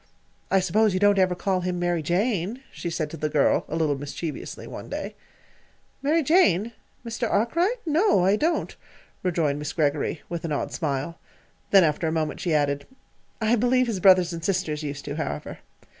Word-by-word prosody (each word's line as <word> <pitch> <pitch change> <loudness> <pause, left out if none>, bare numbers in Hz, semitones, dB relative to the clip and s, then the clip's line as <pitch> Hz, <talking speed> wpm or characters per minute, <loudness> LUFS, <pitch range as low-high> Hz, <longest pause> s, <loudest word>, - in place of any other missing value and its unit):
"I 195 - +3
suppose 200 +3 +2
you - - +1
don't 205 0 +4
ever 185 -1 +3
call 185 0 -1
him 180 0 -2
'Mary 175 -1 0
Jane,'" 200 - -1
she 170 - -5
said 155 -2 -3
to 165 - -7
the 155 0 -1
girl, 145 -1 +2
a 155 - -4
little 155 -3 +1
mischievously, 145 +2 -6
one - - -8
day. - - -5 0.9
"'Mary 310 +4 +2
Jane'? 235 - +3 0.3
Mr. 230 0 -2
Arkwright? 340 - +1
No, 315 - +3
I 195 +2 +4
don't," 325 +8 -1 0.5
rejoined 165 -6 0
Miss 150 0 -4
Greggory, 150 0 0
with 170 0 -5
an 165 - -3
odd 145 - -2
smile. 145 +1 -3 0.5
Then, 195 -2 +7
after 160 +1 +1
a - - 0
moment, 160 -1 -2
she 175 - -2
added: 145 -2 +1 0.5
"I 220 +1 +2
believe 250 +2 +3
his 225 -6 -2
brothers 185 -2 +5
and 165 -1 -6
sisters 180 -6 -1
used 145 -2 -5
to, 145 +1 -5
however." 155 - -4
180 Hz, 180 wpm, -25 LUFS, 155-215 Hz, 0.9 s, Then